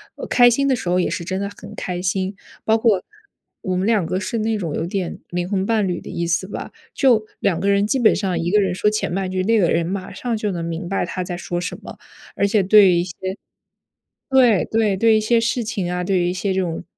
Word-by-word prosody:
呃， -, -, -6 dB
开 245 Hz, -1 st, +6 dB
心 275 Hz, +4 st, +1 dB
的 265 Hz, -, +3 dB
时 200 Hz, -, -6 dB
候 180 Hz, +1 st, +2 dB
也 -, -, +1 dB
是 170 Hz, -, -4 dB
真 190 Hz, +2 st, -3 dB
的 200 Hz, -, -2 dB
很 -, -, -11 dB
开 180 Hz, -1 st, -4 dB
心， 190 Hz, +1 st, -1 dB, 0.3 s
包 220 Hz, 0 st, +3 dB
括 220 Hz, -5 st, +2 dB, 0.6 s
我 185 Hz, -, -2 dB
们 185 Hz, +3 st, 0 dB
两 210 Hz, -7 st, +2 dB
个 185 Hz, -, -2 dB
是 230 Hz, +3 st, -3 dB
那 220 Hz, 0 st, 0 dB
种 165 Hz, -7 st, -3 dB
有 165 Hz, -, -2 dB
点 180 Hz, 0 st, -3 dB
灵 175 Hz, +1 st, -3 dB
魂 195 Hz, -2 st, 0 dB
伴 215 Hz, -2 st, +1 dB
侣 175 Hz, -1 st, -2 dB
的 -, -, -10 dB
意 170 Hz, 0 st, -3 dB
思 180 Hz, +2 st, 0 dB
吧， 205 Hz, -, -7 dB, 0.2 s
就 240 Hz, -6 st, +3 dB
两 180 Hz, -4 st, 0 dB
个 195 Hz, -, -1 dB
人 200 Hz, +1 st, +2 dB
基 270 Hz, -, +1 dB
本 240 Hz, -4 st, +4 dB
上 190 Hz, -4 st, -1 dB
一 170 Hz, +1 st, -1 dB
个 210 Hz, -, +4 dB
人 185 Hz, -2 st, 0 dB
说 210 Hz, -, +2 dB
前 215 Hz, -4 st, -2 dB
半 190 Hz, 0 st, -2 dB
句， 185 Hz, -, -1 dB
另 225 Hz, +4 st, +2 dB
一 -, -, +3 dB
个 175 Hz, -4 st, +3 dB
人 165 Hz, 0 st, +1 dB
马 190 Hz, +2 st, -4 dB
上 230 Hz, +4 st, -3 dB
就 210 Hz, -1 st, -2 dB
能 170 Hz, -2 st, -4 dB
明 170 Hz, +2 st, -4 dB
白 195 Hz, -, -1 dB
他 185 Hz, +1 st, -4 dB
在 180 Hz, 0 st, -5 dB
说 175 Hz, 0 st, -4 dB
什 175 Hz, -, -4 dB
么， -, -, -10 dB, 0.4 s
而 200 Hz, -, +2 dB
且 210 Hz, 0 st, +2 dB
对 195 Hz, +1 st, +6 dB
于 175 Hz, -1 st, +3 dB
一 -, -, +1 dB
些 180 Hz, -1 st, -8 dB, 1.1 s
对 250 Hz, -7 st, +4 dB
对， 220 Hz, -3 st, +1 dB
对 220 Hz, +2 st, +4 dB
一 -, -, +1 dB
些 230 Hz, +2 st, +2 dB
事 235 Hz, +1 st, 0 dB
情 200 Hz, -5 st, -3 dB
啊， 180 Hz, 0 st, -2 dB
对 190 Hz, 0 st, +1 dB
于 175 Hz, 0 st, +1 dB
一 -, -, -2 dB
些 190 Hz, +1 st, -1 dB
这 190 Hz, -, +1 dB
种 170 Hz, -2 st, -3 dB
195 Hz, 285 characters per minute, -21 LUFS, 180-215 Hz, 1.1 s, 开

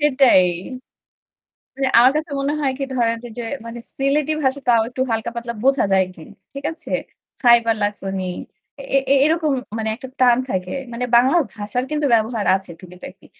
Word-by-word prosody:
সেটাই। 270 Hz, -9 st, +5 dB, 0.3 s
এ -, -, -11 dB, 1.1 s
মানে 270 Hz, -1 st, 0 dB
আমার 250 Hz, +3 st, +7 dB
কাছে 305 Hz, -1 st, -2 dB
মনে 280 Hz, +2 st, -1 dB
হয় 275 Hz, -3 st, +1 dB
কি -, -, -1 dB
ধরেন 230 Hz, -2 st, +1 dB, 0.2 s
যে 240 Hz, -, -4 dB, 0.2 s
মানে 235 Hz, +1 st, -7 dB, 0.2 s
'সিলেটি' 290 Hz, +3 st, +1 dB
ভাষা 265 Hz, +1 st, +1 dB
তাও 230 Hz, -2 st, +5 dB
একটু 255 Hz, +1 st, -5 dB
হালকা 225 Hz, +1 st, -1 dB
পাতলা 235 Hz, 0 st, -4 dB
বোঝা 270 Hz, 0 st, +3 dB
যায় 190 Hz, 0 st, +4 dB
আরকি। 180 Hz, -3 st, -14 dB, 0.3 s
ঠিক 275 Hz, +1 st, -7 dB
আছে? 325 Hz, -, -10 dB, 0.5 s
"খাইবার 235 Hz, -2 st, +4 dB
লাকছনি?" 195 Hz, -2 st, -3 dB, 0.6 s
এ 275 Hz, 0 st, -1 dB
এ -, -, +7 dB
এরকম 315 Hz, -1 st, +1 dB, 0.3 s
মানে 220 Hz, 0 st, -2 dB
একটা 260 Hz, -, -9 dB
টান 245 Hz, -2 st, +5 dB
থাকে। 185 Hz, -3 st, -3 dB, 0.2 s
মানে 245 Hz, +2 st, -2 dB
বাংলা 260 Hz, +7 st, +5 dB, 0.2 s
ভাষার 210 Hz, +3 st, -3 dB
কিন্তু 300 Hz, -1 st, 0 dB
ব্যবহার 220 Hz, -1 st, +1 dB
আছে 190 Hz, -2 st, -6 dB
টুকিটাকি। 180 Hz, 0 st, -12 dB
245 Hz, 170 wpm, -20 LUFS, 220-275 Hz, 1.1 s, আমার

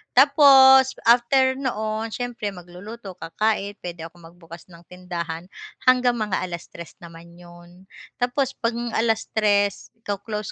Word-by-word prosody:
Tapos, 265 Hz, -1 st, +7 dB, 0.2 s
after 260 Hz, +3 st, +4 dB
noon, 220 Hz, -4 st, -4 dB
s'yempre 240 Hz, -4 st, -5 dB
magluluto, 190 Hz, +3 st, -11 dB
kakain 205 Hz, +3 st, -2 dB
p'wede 175 Hz, -2 st, -8 dB
akong 170 Hz, 0 st, -14 dB
magbukas 170 Hz, 0 st, -14 dB
ng 170 Hz, -1 st, -17 dB
tindahan 175 Hz, -1 st, -6 dB, 0.4 s
hanggang 250 Hz, -1 st, +4 dB
mga 210 Hz, -3 st, -2 dB
3:00 170 Hz, -1 st, -9 dB
naman 170 Hz, 0 st, -14 dB
'yun, 175 Hz, +1 st, -17 dB, 0.3 s
tapos 255 Hz, +2 st, -1 dB
'pag 230 Hz, 0 st, -2 dB, 0.2 s
3:00 215 Hz, -3 st, 0 dB, 0.2 s
co-close 210 Hz, 0 st, -5 dB
205 Hz, 115 wpm, -22 LUFS, 175-245 Hz, 0.4 s, Tapos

